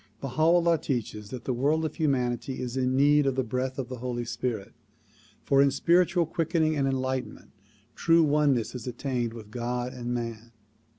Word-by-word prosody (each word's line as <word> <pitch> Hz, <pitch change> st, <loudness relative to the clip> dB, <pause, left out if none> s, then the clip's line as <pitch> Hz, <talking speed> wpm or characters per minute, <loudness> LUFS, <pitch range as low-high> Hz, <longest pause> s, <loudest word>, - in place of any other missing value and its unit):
Baha 135 Hz, +3 st, -4 dB
'Ullaii 170 Hz, 0 st, +4 dB
teaches 110 Hz, -7 st, -3 dB
that 125 Hz, 0 st, -7 dB
the 130 Hz, -, -1 dB
world 150 Hz, +6 st, +1 dB
of 155 Hz, -, -3 dB
humanity 130 Hz, -3 st, -1 dB
is 125 Hz, 0 st, -4 dB
in 130 Hz, 0 st, +1 dB
need 145 Hz, +1 st, +4 dB
of 135 Hz, -, +1 dB
the 130 Hz, -, +1 dB
breath 130 Hz, +3 st, -3 dB
of 135 Hz, -3 st, -3 dB
the 130 Hz, 0 st, -6 dB
Holy 120 Hz, 0 st, -3 dB
Spirit, 115 Hz, -3 st, -4 dB, 0.7 s
for 135 Hz, 0 st, +4 dB
in 140 Hz, -, +5 dB
spiritual 170 Hz, +4 st, +3 dB
quickening 160 Hz, -1 st, 0 dB
and 140 Hz, -2 st, +1 dB
enlightenment 130 Hz, -3 st, -3 dB, 0.4 s
true 165 Hz, +5 st, +4 dB
oneness 145 Hz, -6 st, +2 dB
is 125 Hz, -1 st, -7 dB
attained 125 Hz, -1 st, -2 dB
with 110 Hz, -2 st, -11 dB
God 125 Hz, +2 st, -3 dB
and 120 Hz, -1 st, -5 dB
man. 115 Hz, -1 st, -5 dB
130 Hz, 175 wpm, -27 LUFS, 120-150 Hz, 0.7 s, in